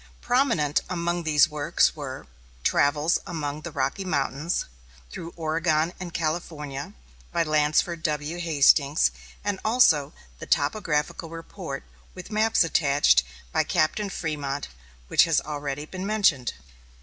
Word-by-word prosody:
Prominent 240 - +2
among 175 -1 -1
these 155 0 +4
works 150 -1 +1
were 135 - -7 0.4
"Travels 150 +4 +2
Among 150 -3 -4
the 170 - -6
Rocky 195 +6 -1
Mountains, 150 -1 -1 0.5
Through 165 - -7
Oregon 160 0 0
and 180 -2 -6
California," 155 -4 -4 0.4
by 170 - +1
Lansford 155 +2 +1
W. 155 +1 -2
Hastings, 150 -2 +4 0.3
and 200 -1 -1
also 170 - +4 0.3
the - - -8
"Topographical 150 0 0
Report, 165 -3 -7 0.3
with 185 +3 -9
Maps 215 -2 +3
Attached," 140 - +4 0.3
by - - +2
Captain 195 +6 0
Frémont, 145 -6 -3 0.4
which - - +5
has 165 -2 +1
been - - +1
already 145 0 -4
mentioned. 190 - +1
155 Hz, 120 wpm, -25 LUFS, 145-175 Hz, 0.5 s, which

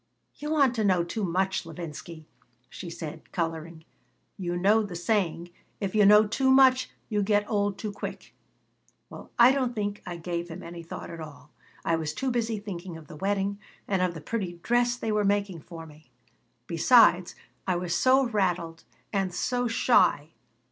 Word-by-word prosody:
"You 295 - -6
want 280 -5 +3
to 220 - +1
know 185 -4 +3
too 205 +5 -4
much, 190 +1 0
Levinsky," 165 -1 -8 0.5
she 180 - -7
said, 160 -1 -8
coloring. 165 -1 -4 0.5
"You 175 -2 -3
know 205 +5 +4
the 200 -4 -5
saying, 175 -2 -1 0.3
'If 195 -3 -3
you 210 -2 +5
know 210 +1 +7
too 265 +5 +1
much 265 -1 +5 0.2
you 210 -2 0
get 205 0 +1
old 205 -2 0
too 210 0 -4
quick.' - - -7 0.8
Well, - - -10
I 240 +2 +8
don't 255 -3 0
think 205 -1 -3
I 175 -1 -6
gave 170 0 -4
him 170 +3 -8
any 170 0 -8
thought 165 - -8
at 165 - -8
all. 150 -1 -11 0.3
I 165 - +2
was 155 -1 -4
too 265 -1 -1
busy 230 -2 -1
thinking 185 -4 -7
of 160 - -13
the 155 - -11
wedding 200 +3 -1 0.3
and 195 -2 0
of 180 -2 0
the 160 - -7
pretty 190 -2 -3
dress 240 0 +2
they 225 -3 -3
were 210 0 +1
making 200 -4 0
for 165 +1 -10
me. 155 0 -17 0.6
Besides. - - +4 0.3
I 185 - +2
was 175 -1 -2
so 260 +6 +4
rattled 180 -7 -1 0.3
and 195 -2 0
so 245 +7 -1
shy. 230 - +3
190 Hz, 175 wpm, -27 LUFS, 170-215 Hz, 0.8 s, I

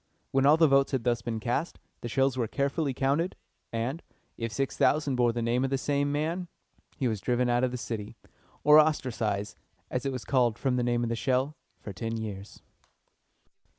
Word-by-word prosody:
When 135 +1 +3
all 150 +2 +7
the 160 -1 +6
votes 135 0 +3
had 130 -3 0
thus 120 -1 +1
been 115 -2 -3
cast, 125 +8 -2 0.2
the - - -5
shells 135 +2 +1
were 120 -3 -1
carefully 140 +4 -1
counted, 140 +7 0 0.4
and, 120 +8 -2 0.3
if 115 -1 -4
six 135 +3 -2
thousand 145 -3 +2
bore 120 -1 +3
the 120 0 -3
name 120 +2 +1
of 135 - 0
the 135 - +1
same 145 +1 0
man, 165 +5 -1 0.5
he 130 - 0
was 110 -4 -2
driven 125 0 +1
out 120 +1 +2
of 130 - +3
the 125 - -4
city, 110 -3 -5 0.5
or 150 +1 +8
ostracized, 120 -9 0 0.3
as 125 - -1
it 135 - -1
was 130 -2 -5
called 120 -5 +2
from 130 0 0
the 125 - +1
name 120 0 +1
of 120 - -1
the 115 - 0
shell, 130 +4 0 0.2
for 100 - -8
ten 115 +3 -3
years. 105 -3 -7
125 Hz, 200 wpm, -28 LUFS, 115-140 Hz, 0.5 s, or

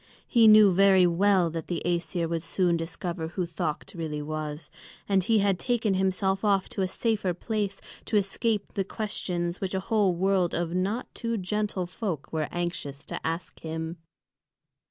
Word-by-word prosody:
He 230 -3 +5
knew 215 -2 +8
very 190 0 +6
well 180 0 +3
that 165 -1 -5
the 175 -2 -2
Æsir 170 -1 0
would 165 0 -2
soon 175 +1 +1
discover 165 0 -3
who 180 +2 -2
Thökt 170 +3 -4
really 155 -3 -3
was. 155 0 -5 0.4
And 195 -2 +3
he 225 +4 +3
had 200 -3 +2
taken 235 -5 +1
himself 190 +1 +1
off 200 -2 +2
to - - -3
a 190 - +2
safer 200 -3 -1
place, 205 0 -2 0.3
to 215 - +1
escape 205 +2 -1
the 195 - 0
questions 180 -4 -3
which 190 0 -2
a - - +1
whole 200 -2 +2
world 185 -1 +1
of 170 0 -1
not 195 +7 -2
too 230 -1 -2
gentle 205 -1 -1
folk 175 -5 -5
were 155 -2 0
anxious 165 -5 -4
to - - -6
ask 165 +2 -4
him. 160 +1 -5
185 Hz, 170 wpm, -27 LUFS, 170-200 Hz, 0.4 s, knew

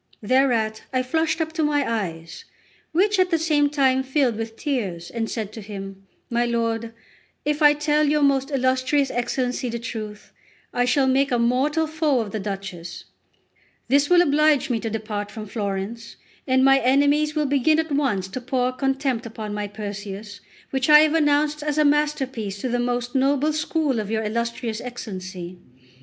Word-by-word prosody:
Thereat 225 -3 +2
I 255 -1 0
flushed 320 +4 0
up 320 0 -3
to 325 -1 0
my 290 -2 +1
eyes, 165 -7 -4 0.5
which 390 +5 +2
at 370 0 +3
the 335 - +2
same 305 -3 +2
time 265 -3 +2
filled 265 -3 +1
with 225 0 -5
tears, 200 - -3
and 225 -1 -3
said 215 -3 -4
to 220 - -8
him: 195 -1 -9 0.2
"My 235 0 0
lord, 230 -1 -1 0.5
if 295 +1 0
I 295 -1 +7
tell 295 0 +1
your 300 0 +2
most 275 -1 +2
illustrious 260 +1 +1
Excellency 245 +1 -2
the 235 - -3
truth, 215 -3 -7 0.4
I 245 - +2
shall 265 +2 +2
make 270 +1 +2
a 245 - +2
mortal 260 +7 +1
foe 310 -4 +1
of 215 -3 -3
the 220 - -3
Duchess; 195 -3 -6 0.8
this 285 +1 +3
will 355 0 +6
oblige 300 -3 +3
me 230 - 0
to 225 - -3
depart 210 -1 -4
from 215 0 -7
Florence, 205 +2 -4 0.3
and 260 0 +3
my 270 0 +6
enemies 285 +4 +2
will 305 -1 +1
begin 285 +2 +3
at 320 -1 -1
once 260 -10 0
to 255 - -5
pour 250 0 0
contempt 270 -2 -1
upon 215 -2 -6
my 210 0 -3
Perseus, 205 0 -7 0.3
which 265 +1 0
I 300 0 +9
have 310 0 +3
announced 300 -1 +2
as 300 0 -2
a 305 - +4
masterpiece 270 -8 0
to 255 - -2
the 245 0 0
most 245 0 -2
noble 280 +3 +2
school 305 -4 0
of 210 -1 -4
your 220 0 -1
illustrious 230 +1 -3
Excellency. 185 -7 -7
255 Hz, 175 wpm, -23 LUFS, 220-290 Hz, 0.8 s, I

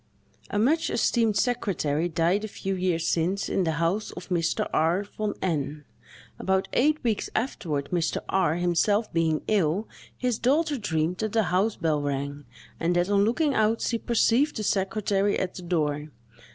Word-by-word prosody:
A - - -2
much 285 +10 +2
esteemed 225 -3 +2
secretary 175 - 0
died 170 +5 +1
a - - -2
few 195 -2 -4
years 180 -3 0
since, 175 +5 0
in 190 - 0
the 160 - 0
house 175 +6 0
of 175 +1 -9
Mr. 170 -2 0
R—— 170 +5 +2
von 205 0 -4
N——. 150 -4 -2 0.5
About 190 0 +1
eight 300 +4 +3
weeks 225 -4 0
afterward, 160 - -2
Mr. 170 -2 0
R—— 190 -5 +2
himself 180 +5 +1
being 160 -2 +1
ill, 200 0 +1 0.3
his 250 -3 -1
daughter 290 +3 +1
dreamed 160 -3 -1
that 220 0 -3
the 225 -1 +3
house 200 +4 +2
bell 155 -3 0
rang, 140 0 -3 0.3
and 170 +1 +1
that, 175 +3 +1
on 200 0 +4
looking 285 +6 +1
out, 220 0 +2
she 230 - 0
perceived 240 +6 +2
the 215 - -3
secretary 200 0 +1
at 185 - -2
the 185 - -8
door. 150 -4 -1
190 Hz, 165 wpm, -26 LUFS, 165-220 Hz, 0.5 s, on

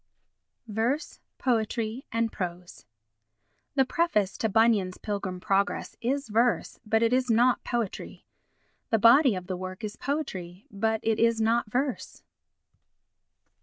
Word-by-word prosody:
Verse, 230 +8 -2 0.2
Poetry 230 0 -1
and 230 0 0
Prose 175 - -6 0.9
The 270 -2 +4
preface 255 - +1
to 220 - +1
Bunyan's 210 -4 +3
Pilgrim's 200 -3 -4
Progress 200 +1 0
is 275 +4 -1
verse, 230 +3 +1
but 220 0 +1
it 230 +1 +2
is 255 0 +1
not 240 +3 +3
poetry. 235 -5 -4 0.6
The 225 - +3
body 235 +2 +6
of 185 -1 -5
the 185 0 -3
work 185 +3 -7
is 210 0 -5
poetry, 195 - -4
but 220 +2 0
it 225 -1 +1
is 230 0 +3
not 225 0 +1
verse. 265 +2 -3
225 Hz, 130 wpm, -27 LUFS, 200-245 Hz, 0.9 s, body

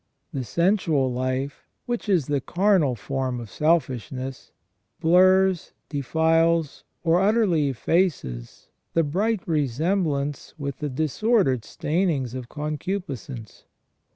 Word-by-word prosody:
The 135 - -2
sensual 160 - +1
life, 130 +2 -3 0.2
which 240 -3 -3
is 175 -8 +3
the 145 -1 0
carnal 175 -6 +2
form 130 +2 -3
of 115 -4 -9
selfishness, 135 -4 -1 0.5
blurs, 185 +2 +4 0.2
defiles, 160 +2 +1 0.2
or 170 +1 +3
utterly 195 -8 +3
effaces 130 - -1 0.3
the 165 - +4
bright 195 +8 0
re 150 -4 +1
semblance 150 0 -1
with 140 -2 -4
the 150 - -2
disordered 155 - +1
stainings 150 - -1
of 125 -2 -6
concupiscence. 150 - -5
150 Hz, 105 wpm, -24 LUFS, 130-180 Hz, 0.5 s, blurs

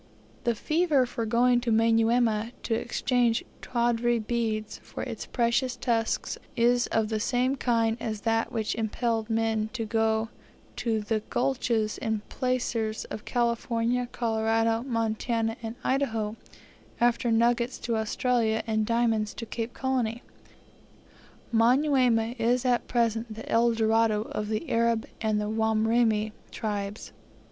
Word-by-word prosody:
The 235 -1 +2
fever 305 0 +2
for 230 -2 -4
going 245 +2 +3
to 240 -1 -1
Manyuema 225 0 +2
to 230 - -1
exchange 240 0 +1 0.2
tawdry 240 0 +1
beads 220 -1 -2
for - - -7
its - - -6
precious 245 +1 +1
tusks 230 -3 -1 0.2
is 240 0 +3
of 220 -1 0
the 220 -1 -1
same 250 +4 +1
kind 230 -3 +1
as 215 -2 -4
that 225 0 0
which 220 -2 -1
impelled 225 0 -1
men 225 -1 0
to 230 -3 -3
go 220 0 +1 0.5
to 225 -2 0
the 215 +1 0
gulches 235 -4 0
and 220 -2 -2
placers 240 -4 -1
of 210 - -6
California, 235 0 0
Colorado, 225 0 +1
Montana, 230 -1 -1
and 225 0 -5
Idaho; 225 -6 0 0.6
after 240 0 +2
nuggets 235 +2 +2
to 235 - -1
Australia, 220 0 +1
and 220 -1 0
diamonds 230 -2 +1
to 230 - -5
Cape 230 +1 -5
Colony. 250 -3 -1 1.3
Manyuema 245 -1 +3
is 245 +2 +1
at 245 -1 +1
present 230 -2 0
the 225 - -9
El 235 +1 +3
Dorado 220 -1 +2
of 210 -2 -4
the 220 +9 -2
Arab 230 -1 +2 0.2
and 215 -1 +1
the 210 - -1
Wamrima 220 0 +2 0.2
tribes. 205 -2 -4
230 Hz, 130 wpm, -27 LUFS, 220-240 Hz, 1.3 s, going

